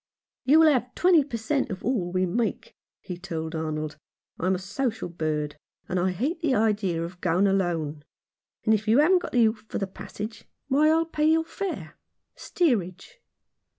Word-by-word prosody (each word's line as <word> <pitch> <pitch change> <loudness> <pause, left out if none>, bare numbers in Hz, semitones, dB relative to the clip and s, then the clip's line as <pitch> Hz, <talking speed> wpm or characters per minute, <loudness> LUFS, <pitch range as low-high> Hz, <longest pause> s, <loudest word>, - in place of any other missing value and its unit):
"You 310 +4 +6
shall 310 -2 +6
have 250 -1 -2
twenty 350 -4 +5
per 265 -4 -5
cent, 270 +5 -1
of 190 -1 -6
all 205 -8 0
we 185 +1 +1
make," 225 +6 -2 0.3
he 180 -2 -7
told 165 -3 -5
Arnold. 155 -2 -3 0.2
" - - -39
I'm 185 +2 +1
a - - -2
social 220 +3 -3
bird, 155 -3 -2 0.3
and 185 - -1 0.2
hate 300 - -2
the 290 -6 +2
idea 205 -6 +1
of 175 +2 -8
going 180 +2 +2
alone. 170 -6 0 0.6
And 220 - +4
if 215 0 0
you 225 +3 +5
haven't 350 +6 +5
got - - -6
the 240 -2 +5
oof 220 -1 -1
for - - -3
the 195 - -1
passage, 210 +3 -8 0.2
why, 295 +3 +4
I'll 325 +1 +3
pay 305 -2 -1
your 325 0 +3
fare 390 +3 -5 0.2
— - - -56
steerage." 240 - -1
215 Hz, 185 wpm, -26 LUFS, 175-280 Hz, 0.6 s, You